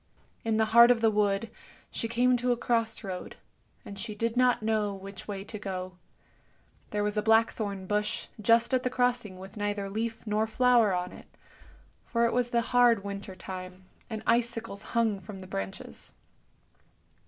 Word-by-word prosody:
In 225 Hz, -1 st, +1 dB
the 220 Hz, -, +3 dB
heart 235 Hz, +1 st, +9 dB
of 245 Hz, -2 st, +4 dB
the 225 Hz, -1 st, +4 dB
wood 210 Hz, +1 st, +1 dB, 0.4 s
she 230 Hz, -, -2 dB
came 245 Hz, +2 st, +3 dB
to 245 Hz, +1 st, 0 dB
a 240 Hz, -, +1 dB
cross 230 Hz, -1 st, 0 dB
road, 185 Hz, -3 st, -6 dB, 0.5 s
and 200 Hz, -1 st, -8 dB
she 215 Hz, -2 st, -5 dB
did 230 Hz, +2 st, -1 dB
not 250 Hz, -2 st, +3 dB
know 215 Hz, -2 st, 0 dB
which 195 Hz, 0 st, -10 dB
way 195 Hz, -2 st, -4 dB
to 210 Hz, +1 st, -8 dB
go. 185 Hz, -2 st, -5 dB, 0.9 s
There 210 Hz, 0 st, -1 dB
was 210 Hz, +1 st, -1 dB
a -, -, +3 dB
blackthorn 215 Hz, -3 st, +2 dB
bush 210 Hz, +2 st, -1 dB, 0.2 s
just 230 Hz, +4 st, +4 dB
at 255 Hz, -, +3 dB
the 255 Hz, -, -1 dB
crossing 245 Hz, -6 st, 0 dB
with 190 Hz, +3 st, -11 dB
neither 205 Hz, -1 st, -2 dB
leaf 225 Hz, +2 st, -3 dB
nor 215 Hz, +1 st, +1 dB
flower 240 Hz, -2 st, +4 dB
on 180 Hz, 0 st, -3 dB
it, -, -, -13 dB, 0.8 s
for 235 Hz, 0 st, +1 dB
it 230 Hz, -, +1 dB
was 245 Hz, 0 st, +1 dB
the 235 Hz, -1 st, +2 dB
hard 235 Hz, -3 st, +4 dB
winter 200 Hz, -1 st, -6 dB
time, 185 Hz, 0 st, -8 dB, 0.2 s
and 220 Hz, -1 st, -5 dB
icicles 230 Hz, -3 st, 0 dB, 0.2 s
hung 220 Hz, -4 st, +2 dB
from 195 Hz, +1 st, -9 dB
the 190 Hz, -, -9 dB
branches. 95 Hz, -, -6 dB
215 Hz, 175 wpm, -29 LUFS, 200-235 Hz, 0.9 s, heart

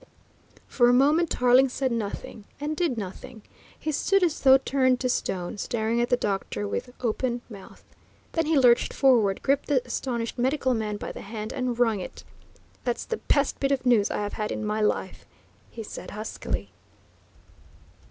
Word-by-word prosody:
For 240 Hz, -2 st, +3 dB
a -, -, +5 dB
moment 300 Hz, +6 st, +4 dB
Tarling 250 Hz, +2 st, +4 dB
said 260 Hz, 0 st, -1 dB
nothing 215 Hz, -1 st, -5 dB
and 300 Hz, +2 st, -2 dB
did 320 Hz, -8 st, 0 dB
nothing. 205 Hz, +2 st, -7 dB, 0.3 s
He 310 Hz, -, -3 dB
stood 390 Hz, +6 st, +2 dB
as 335 Hz, -4 st, +1 dB
though 265 Hz, -1 st, +7 dB
turned 260 Hz, -2 st, +1 dB
to 255 Hz, -, 0 dB
stone, 185 Hz, -4 st, -2 dB
staring 230 Hz, +2 st, -1 dB
at 240 Hz, -, 0 dB
the 245 Hz, -, +3 dB
doctor 195 Hz, -, -2 dB
with 100 Hz, -, -4 dB
open 240 Hz, +1 st, -1 dB
mouth. 200 Hz, -3 st, -12 dB, 0.5 s
Then 325 Hz, -2 st, 0 dB
he 320 Hz, -1 st, +3 dB
lurched 245 Hz, -3 st, +4 dB
forward, 230 Hz, -8 st, +3 dB
gripped 275 Hz, 0 st, +1 dB
the 265 Hz, -4 st, +1 dB
astonished 235 Hz, -2 st, -3 dB
medical 260 Hz, +1 st, +1 dB
man 215 Hz, -2 st, -2 dB
by -, -, -6 dB
the -, -, -9 dB
hand, 215 Hz, +1 st, -6 dB
and 250 Hz, -3 st, -2 dB
wrung 225 Hz, -4 st, +2 dB
it. 180 Hz, -, -8 dB, 0.6 s
"That's 240 Hz, -2 st, -2 dB
the 460 Hz, -, -3 dB
best 280 Hz, -8 st, 0 dB
bit 275 Hz, 0 st, 0 dB
of 265 Hz, -2 st, 0 dB
news 230 Hz, -5 st, +4 dB
I -, -, -2 dB
have 205 Hz, -, -4 dB
had 210 Hz, -1 st, -3 dB
in 220 Hz, -, -3 dB
my 210 Hz, +1 st, -1 dB
life," 210 Hz, -, -1 dB, 0.4 s
he 225 Hz, -, -8 dB
said -, -, -8 dB
huskily. 215 Hz, +1 st, -5 dB
245 Hz, 175 wpm, -26 LUFS, 215-270 Hz, 0.6 s, though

